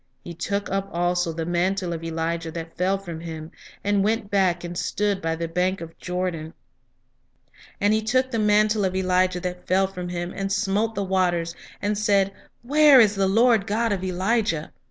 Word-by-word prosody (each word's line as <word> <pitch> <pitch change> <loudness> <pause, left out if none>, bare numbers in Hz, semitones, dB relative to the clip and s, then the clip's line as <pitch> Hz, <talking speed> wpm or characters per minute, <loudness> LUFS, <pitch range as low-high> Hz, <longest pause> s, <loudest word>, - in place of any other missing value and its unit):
He 175 - -7
took 200 +4 -2
up 195 0 -1
also 175 0 0
the 165 0 -4
mantle 175 +1 0
of 165 0 -6
Elijah 165 0 -2
that 165 0 -7
fell 190 +2 +1
from 175 -4 -7
him, 160 -1 -7 0.3
and 205 -1 +2
went 215 -1 -1
back, 185 -3 +2
and 175 0 -6
stood 205 +2 -1
by 165 0 -1
the 165 0 -3
bank 180 +3 0
of 165 -1 -9
Jordan; 180 -3 -3 1.2
and 205 +1 +3
he 220 - +2
took 255 +4 +1
the 230 - -1
mantle 210 0 +3
of 185 -1 0
Elijah 185 -1 +2
that 180 0 -5
fell 190 +1 +3
from 180 -2 -6
him, 175 0 -4
and 195 0 -3
smote 205 +2 0
the 200 - -1
waters, 175 -3 0 0.3
and 205 0 0
said, 200 -2 +2 0.3
Where 290 +1 +6
is 215 -3 +5
the 195 -1 +1
Lord 225 +1 +3
God 225 +2 0
of 190 -2 -1
Elijah? 185 -3 0
190 Hz, 185 wpm, -24 LUFS, 175-205 Hz, 1.2 s, Where